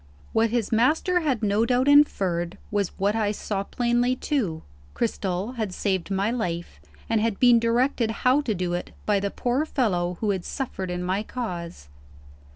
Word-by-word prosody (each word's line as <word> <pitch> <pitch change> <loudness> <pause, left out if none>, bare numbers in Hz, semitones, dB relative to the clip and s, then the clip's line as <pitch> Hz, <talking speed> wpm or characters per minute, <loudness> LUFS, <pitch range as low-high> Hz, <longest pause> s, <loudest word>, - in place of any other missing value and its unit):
What 225 +1 +3
his 230 -2 -1
master 305 +10 +3
had 270 -9 -1
no 205 +1 +2
doubt 250 +3 +2
inferred, 190 -12 +3
was 205 -2 +1
what 200 +2 +1
I 215 -2 +1
saw 205 -1 -3
plainly 240 +3 +1
too. 225 - -2 0.3
Cristel 210 +1 -2
had 215 -4 -2
saved 190 -3 -1
my 200 +3 0
life, 175 -8 -3 0.3
and 225 -1 +1
had 220 -3 -1
been 245 -2 +6
directed 235 +1 +1 0.2
how 260 +3 +5
to 230 -7 -2
do 180 -1 -2
it 175 - -4
by 205 -2 +2
the 200 +1 -1
poor 250 +7 0
fellow 180 - 0
who 215 -2 +1
had 190 -3 -2
suffered 195 -8 -4
in 180 0 -3
my 185 +3 0
cause. 175 - -6
220 Hz, 170 wpm, -25 LUFS, 190-245 Hz, 0.3 s, been